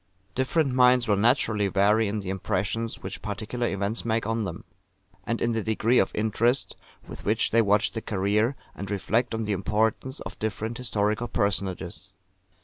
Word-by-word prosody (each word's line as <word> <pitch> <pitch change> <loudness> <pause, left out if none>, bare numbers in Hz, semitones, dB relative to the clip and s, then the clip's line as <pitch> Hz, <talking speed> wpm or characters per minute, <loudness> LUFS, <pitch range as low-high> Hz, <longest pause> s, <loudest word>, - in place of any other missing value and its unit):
Different 130 +3 +1
minds 125 -1 +5
will 105 - +3
naturally 110 -1 +2
vary 105 +3 +3
in 105 +1 -2
the 95 -1 -4
impressions 105 +4 -2
which - - -4
particular 110 +3 -3
events 100 +3 -1
make 115 -1 0
on 115 0 -1
them; 85 -2 -6 0.6
and 115 - -1
in 120 - +1
the 115 -1 0
degree 110 +3 +2
of 95 - +2
interest 115 +4 +2 0.3
with - - -9
which - - +1
they 115 - +5
watch 105 +3 +2
the 115 - -4
career, 105 +6 +1 0.2
and 100 - -7
reflect 110 +4 0
on 110 -1 -2
the 105 - 0
importance, 110 - 0
of - - -8
different 110 +2 -3
historical 110 0 0
personages. 95 -4 -2
110 Hz, 165 wpm, -26 LUFS, 100-115 Hz, 0.6 s, minds